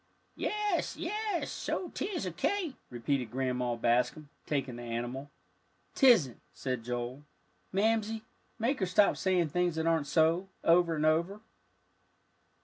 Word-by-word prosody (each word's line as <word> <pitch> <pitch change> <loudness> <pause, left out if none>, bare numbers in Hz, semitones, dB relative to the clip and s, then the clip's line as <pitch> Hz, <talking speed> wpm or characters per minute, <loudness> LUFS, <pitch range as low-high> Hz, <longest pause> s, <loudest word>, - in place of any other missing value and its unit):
"Yes, 420 -4 -1
yes 420 -4 -2
so 360 - -3
'tis 390 -2 -3
a - - -2
cake," 380 -8 -1 0.2
repeated 125 0 -1
Grandma 125 -1 -1
Bascom, 125 +5 +1 0.2
taking 135 -4 -1
the - - -7
animal. 120 +4 -4 0.6
"'Tisn't," 225 - +5
said 125 -3 -3
Joel. 125 +3 -4 0.5
"Mamsie, 220 +2 +1 0.3
make 245 +5 0
her 190 - +1
stop 200 +3 +4
saying 180 -4 +1
things 175 +1 +1
that 160 0 -1
aren't 165 -3 +2
so, 160 +6 +3 0.2
over 170 0 +4
and 155 0 0
over." 170 +6 +2
160 Hz, 130 wpm, -31 LUFS, -, 0.6 s, Tisn't